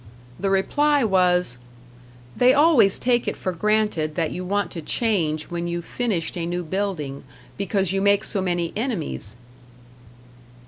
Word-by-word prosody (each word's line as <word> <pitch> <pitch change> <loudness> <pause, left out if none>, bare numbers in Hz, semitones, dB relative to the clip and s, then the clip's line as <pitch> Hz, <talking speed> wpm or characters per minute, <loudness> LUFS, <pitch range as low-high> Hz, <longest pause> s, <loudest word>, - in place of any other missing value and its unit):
The 195 - 0
reply 290 +9 +2
was, 180 - +2 0.8
"They 250 +1 +5
always 285 - +5
take 240 -1 +1
it - - -2
for 185 - -2
granted 195 -5 0
that 165 -3 -1
you 180 - -5
want 195 -1 -1
to 165 - -6
change 160 -6 -1
when 170 0 -3
you've 170 0 -4
finished 215 -10 -2
a 170 -1 -3
new 175 +1 -2
building, 170 -6 -3 0.3
because 195 -2 0
you 195 0 0
make 200 0 +3
so 200 - +1
many 175 -2 -1
enemies!" 205 - -3
190 Hz, 145 wpm, -23 LUFS, 170-215 Hz, 0.8 s, They